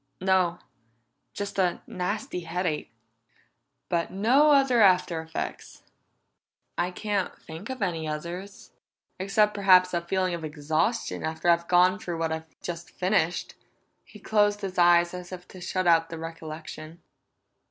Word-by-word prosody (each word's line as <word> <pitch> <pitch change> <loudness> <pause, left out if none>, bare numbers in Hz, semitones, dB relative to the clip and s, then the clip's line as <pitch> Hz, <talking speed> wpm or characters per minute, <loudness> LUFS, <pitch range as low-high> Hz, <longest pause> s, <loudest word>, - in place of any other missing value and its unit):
"No. 185 -2 +2 0.8
Just 200 -1 -4
a 180 -2 +1
nasty 185 +1 -3
headache." 170 -4 -3 1.0
"But 170 -1 0
no 245 +10 +4
other 270 -5 +4
after 180 -4 +4
effects?" 160 0 -6 0.9
"I 175 +1 0
can't 200 +1 -3
think 165 +8 -9
of 260 -4 -3
any 165 -4 -2
others. 170 +6 -6 0.5
Except, 210 +2 +2
perhaps, 185 -2 +5
a 170 - +1
feeling 185 +1 -1
of 170 -1 -5
exhaustion 155 +9 -1
after 160 +2 -1
I've 170 0 +1
gone 180 +2 +4
through 175 -5 -4
what 165 -1 -1
I've 160 0 -6
just 170 -1 -6
finished." 180 -3 0 0.5
He - - -15
closed 205 0 +1
his 190 -2 -4
eyes 175 0 +5
as 180 0 -8
if 180 -1 -8
to 185 - -12
shut 185 +1 -2
out 165 -1 +4
the 165 - -6
recollection. 160 0 -8
180 Hz, 140 wpm, -27 LUFS, 165-195 Hz, 1.0 s, perhaps